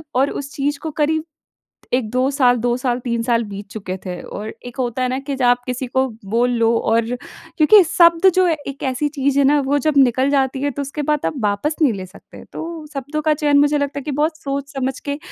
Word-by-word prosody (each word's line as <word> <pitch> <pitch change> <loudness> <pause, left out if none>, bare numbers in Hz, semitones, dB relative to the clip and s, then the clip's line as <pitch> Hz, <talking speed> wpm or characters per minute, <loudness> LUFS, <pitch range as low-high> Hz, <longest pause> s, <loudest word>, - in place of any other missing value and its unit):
और 270 +2 +3
उस 280 0 -6
चीज़ 285 +1 -1
को 320 - -5
करीब 315 +1 +1 0.7
1-2 255 +2 +1
साल 250 -3 +3
2 240 +1 0
साल, 250 -1 -1
3 235 -2 -2
साल 235 -1 +1
बीत 205 -1 -8
चुके 190 -4 -5
थे 180 -1 -5
और 215 +1 -7
एक 245 - -9
होता 245 0 -1
है 255 - +2
ना 260 - -1
कि 275 0 -4
जब 260 -2 0
आप 245 0 +3
किसी 250 0 -3
को 260 +2 +1 0.2
बोल 235 +5 +1
लो 230 0 +3 0.2
और 230 0 +3 0.5
क्योंकि 370 +6 +7
शब्द 340 +2 +5
जो 370 0 +4
है 330 - +2
एक 275 0 -7
ऐसी 265 +2 0
चीज़ 280 -1 0
है - - +5
ना, 290 +1 +4
वो 275 +2 +1
जब 285 +1 0
निकल 260 0 +4
जाती 270 -1 +1
है, 285 0 0
तो 285 - -4
उसके 280 +2 -4
बाद 300 - 0
आप - - 0
वापस 210 +9 0
नहीं 290 -5 +5
ले 190 -2 -6
सकते। 185 +2 -15
तो 325 -2 -6
शब्दों 285 +3 -3
का 310 0 +2
चयन 295 -1 +2
मुझे 290 +1 +3
लगता 285 0 -2
है - - -9
कि 295 - -4
बहुत 310 +3 0
सोच 280 -2 -5
समझ 265 0 -2
के 285 - -1
270 Hz, 240 wpm, -20 LUFS, 245-295 Hz, 0.7 s, क्योंकि